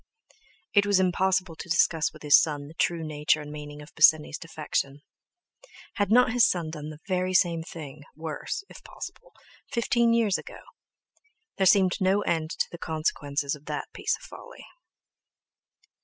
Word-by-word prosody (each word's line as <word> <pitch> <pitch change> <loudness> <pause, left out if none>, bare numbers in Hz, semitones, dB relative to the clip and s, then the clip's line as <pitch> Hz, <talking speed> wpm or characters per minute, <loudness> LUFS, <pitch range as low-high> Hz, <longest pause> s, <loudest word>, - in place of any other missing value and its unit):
It 200 -1 +4
was 200 -2 +4
impossible 185 -1 +1
to 175 - -9
discuss 160 -1 +2
with 155 - -15
his 145 -1 +7
son 145 -2 -3
the 155 - -12
true 170 0 0
nature 150 0 +1
and 150 0 -8
meaning 150 0 -8
of 150 - -16
Bosinney's 155 -1 +4
defection. 150 -3 -3 0.9
Had 205 -2 +1
not 245 0 +5
his 245 -1 +4
son 170 -3 -2
done 150 -1 -7
the 155 0 -11
very 185 -1 0
same 170 -2 +3
thing 155 -3 -9
(worse, 160 - -5
if - - -14
possible) - - -10 0.4
fifteen 235 0 +2
years 225 -4 +2
ago? - - -11 1.0
There 190 - +3
seemed 190 0 +4
no 190 +2 +3
end 160 -2 -1
to - - -1
the 170 - -9
consequences 145 -3 -2
of 150 -1 -9
that - - -5
piece - - -1
of - - -17
folly. - - -12
165 Hz, 160 wpm, -27 LUFS, 150-190 Hz, 1.0 s, his